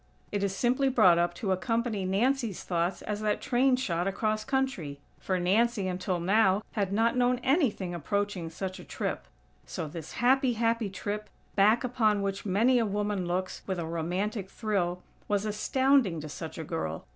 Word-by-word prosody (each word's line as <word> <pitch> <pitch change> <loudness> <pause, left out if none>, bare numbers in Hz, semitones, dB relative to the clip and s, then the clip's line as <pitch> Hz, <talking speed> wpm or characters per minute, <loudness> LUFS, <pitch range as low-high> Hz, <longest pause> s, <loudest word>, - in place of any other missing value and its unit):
It 205 -1 -1
is 195 -1 -1
simply 255 +5 +2
brought 185 -9 +5
up 175 0 +1
to 190 +2 -2
accompany 225 +1 0
Nancy's 230 +2 0
thoughts 175 +1 -1
as 210 0 -3
that 210 -1 0
train 255 +1 +3
shot 175 -8 -1
across 215 +2 -1
country; 265 - -2 0.2
for 185 -1 -1
Nancy, 200 +3 +2
until 180 0 -2
now, 195 +2 +3
had 200 -3 -1
not 225 +4 +2
known 250 0 +3
anything 260 - +1
approaching 190 +1 -2
such 185 +3 -5
a - - -9
trip. - - -4 0.4
So 160 - -4
this 160 0 -8
happy, 260 +1 +3
happy 230 -1 0
trip, 205 +2 -4 0.3
back 215 +5 +4
upon 220 -5 +1
which 195 +1 -3
many 230 +7 +3
a 230 - +2
woman 205 -2 -1
looks, 185 +1 -2
with 190 -2 -2
a 170 - -3
romantic 180 +5 -2
thrill, 180 -6 -1 0.2
was 205 0 0
astounding 235 - +2
to 150 - -7
such 160 +2 -7
a 160 - -4
girl. 145 - -4
205 Hz, 170 wpm, -29 LUFS, 180-230 Hz, 0.4 s, brought